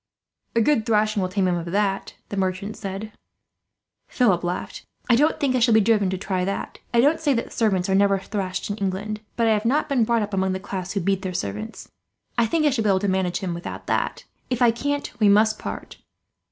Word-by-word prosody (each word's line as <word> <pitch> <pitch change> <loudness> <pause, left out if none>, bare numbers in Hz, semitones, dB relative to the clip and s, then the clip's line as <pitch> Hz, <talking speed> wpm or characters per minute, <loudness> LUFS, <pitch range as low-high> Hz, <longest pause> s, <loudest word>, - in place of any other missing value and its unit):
"A 230 - +4
good 230 -1 +3
thrashing 215 -1 +2
will 185 - -1
tame 190 0 +1
him 180 - +2
of 170 -1 -3
that," 195 +2 -1
the - - -4
merchant 195 +2 -2
said. 195 +2 -6 1.0
Philip 195 -9 +2
laughed. 175 +1 -4 0.2
"I 240 - +5
don't 295 +6 +2
think 270 -3 +1
I - - +3
shall 230 -1 +4
be - - +7
driven 210 -2 +3
to 190 - -2
try 185 -1 -2
that. 195 +2 -4
I 235 - +3
don't 300 +5 +3
say 295 -4 +2
that 230 - -3
servants 195 -6 +1
are 190 - +1
never 200 0 +4
thrashed 195 0 -3
in 205 - -4
England, 205 +2 -3
but 230 - +1
I 225 - +4
have 210 0 0
not 290 +6 +1
been 265 -4 +3
brought 230 0 +2
up 205 0 -6
among 190 -1 +1
the 190 - -3
class 190 -1 -5
who 200 - -1
beat 195 +2 0
their 185 -1 -4
servants. 105 - -5 0.5
I 235 -1 +3
think 310 +6 +1
I 295 - +4
shall 240 -4 0
be 210 - +2
able 190 -1 +3
to 205 - 0
manage 185 -2 0
him 185 -3 -2
without 170 +1 -7
that. - - -1 0.3
If 250 -2 -1
I 240 -2 +5
can't, 285 +5 -3
we 210 -2 +5
must 215 +1 +4
part. - - -7
205 Hz, 230 wpm, -23 LUFS, 190-230 Hz, 1.0 s, be